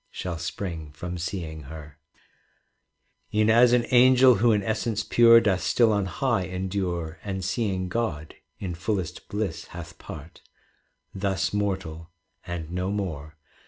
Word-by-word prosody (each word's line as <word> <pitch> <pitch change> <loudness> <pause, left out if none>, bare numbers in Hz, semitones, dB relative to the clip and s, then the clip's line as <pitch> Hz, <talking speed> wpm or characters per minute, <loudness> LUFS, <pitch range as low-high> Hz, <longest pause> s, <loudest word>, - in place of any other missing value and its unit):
It - - -15
is, - - -4
however, 85 -1 -5
»73 90 +3 -3
CANZONIERE 80 -1 -9 1.4
E'en 110 0 +3
as 120 +2 +6
an 125 -1 +3
angel 130 +1 +7
who 115 +3 +4
in 105 -2 +2
essence 110 0 -1
pure 115 -1 +7
Doth 95 -5 +1
still 115 -3 +3
on 100 -2 0
high 115 +1 0
endure, 90 -3 -3
And 95 -2 -4
seeing 95 -3 -1
God, 90 -7 -3 0.2
in 90 -3 -4
fullest 90 -1 -3
bliss 105 -5 -3
hath 85 - -9
part: 80 +2 -10 0.7
Thus 95 0 -1
mortal, 90 -5 -3 0.4
and 85 -2 -5
no 90 +1 -2
more. 80 -7 -4
95 Hz, 135 wpm, -26 LUFS, 85-110 Hz, 1.4 s, angel